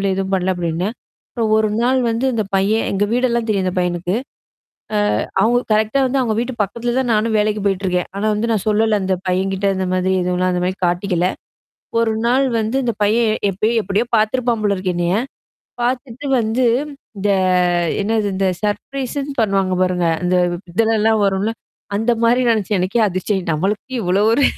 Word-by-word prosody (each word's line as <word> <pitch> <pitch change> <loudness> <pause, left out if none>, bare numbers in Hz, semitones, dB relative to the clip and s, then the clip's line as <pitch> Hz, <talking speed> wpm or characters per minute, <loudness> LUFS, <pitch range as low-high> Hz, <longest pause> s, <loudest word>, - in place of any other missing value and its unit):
இல்ல 195 - 0
எதுவும் 195 0 -1
பண்ல 190 0 +1
அப்டின்னே. 175 +2 -2 0.4
அப்புறம் 225 -3 -1
1 220 0 +2
நாள் 255 +2 +2
வந்து 230 +3 -1
இந்த 225 -2 0
பையன் 200 +4 +2
எங்க 200 +1 +1
வீடெல்லாம் 235 -2 +1
தெரியும். 195 -3 +1
அந்த 185 - 0
பையனுக்கு. 180 +1 -1 1.1
அ - - -1 0.2
அவங்க 235 +4 +3
கரெக்ட்டா 220 +5 +2
வந்து 265 +1 0
அவங்க 220 -3 0
வீட்டு 245 +2 -2
பக்கத்தில 235 +4 -2
தான் 255 -2 +1
நானும் 220 +1 +1
வேலைக்கு 210 0 0
போயிட்டுருக்கேன். 185 -2 0
ஆனா 200 - -2
வந்து 225 +3 -1
நான் 215 -4 0
சொல்லல. 215 0 +2
அந்த 190 0 0
பையன்கிட்ட 190 +2 0
இந்த 190 - -1
மாதிரி 185 +1 +1
எதுவும்லாம் 180 +1 0
அந்த 180 - -1
மாரி 185 +1 -1
காட்டிக்கல. 180 0 0 0.7
1 225 -1 +1
நாள் 260 +3 +3
வந்து 220 +5 -1
இந்த 235 -2 0
பையன் 220 +1 +2 0.2
எப்பையோ 215 +5 0
எப்டியோ 205 +5 0
பார்த்தருப்பான் 230 +1 +1
போல 200 -1 +2
இருக்கு 185 -1 -2
என்னைய? 175 +1 +1 0.7
பார்த்தட்டு 250 +2 -3
வந்து 225 +3 0 0.5
இந்த 200 +1 -1 0.8
என்னது 215 0 0
இந்த 195 0 0 0.2
சர்ப்ரைஸ்ன்னு 275 +6 -3
பண்ணுவாங்க 195 -3 +1
பாருங்க. 180 -1 0 0.2
அந்த 180 +1 +1 0.4
இதெல்லல்லாம் 220 0 +2
வரும்ல. 195 +2 0 0.5
அந்த 225 +3 +1
மாரி 240 +2 +4
நெனைச்சேன். 210 -3 0
எனக்கே 195 +6 +1
அதிர்ச்சய 190 +1 -1
நம்மளுக்கு 200 - -2
இவ்ளோ 185 +2 +2
ஒரு 280 - +2
210 Hz, 165 wpm, -19 LUFS, 190-230 Hz, 1.1 s, மாரி